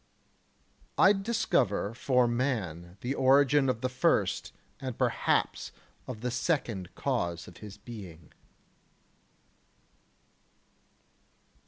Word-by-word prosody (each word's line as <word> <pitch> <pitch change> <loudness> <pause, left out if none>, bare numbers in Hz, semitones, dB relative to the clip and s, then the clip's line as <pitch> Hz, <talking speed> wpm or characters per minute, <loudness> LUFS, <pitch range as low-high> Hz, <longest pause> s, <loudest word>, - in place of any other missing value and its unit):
3. - - +6
I 195 - +8
discover 195 - 0
for 125 0 +2
man 105 - -2
the 125 +3 -1
origin 135 +1 +4
of 115 -3 -1
the 130 - +1
first 125 0 +1 0.3
and 130 -3 -5
perhaps - - 0 0.4
of 115 -4 -6
the 125 0 -2
second 120 - -1
cause 85 -1 -2
of 90 - -12
his 105 -2 -10
being. 95 -8 -11
120 Hz, 100 wpm, -30 LUFS, 95-135 Hz, 0.4 s, I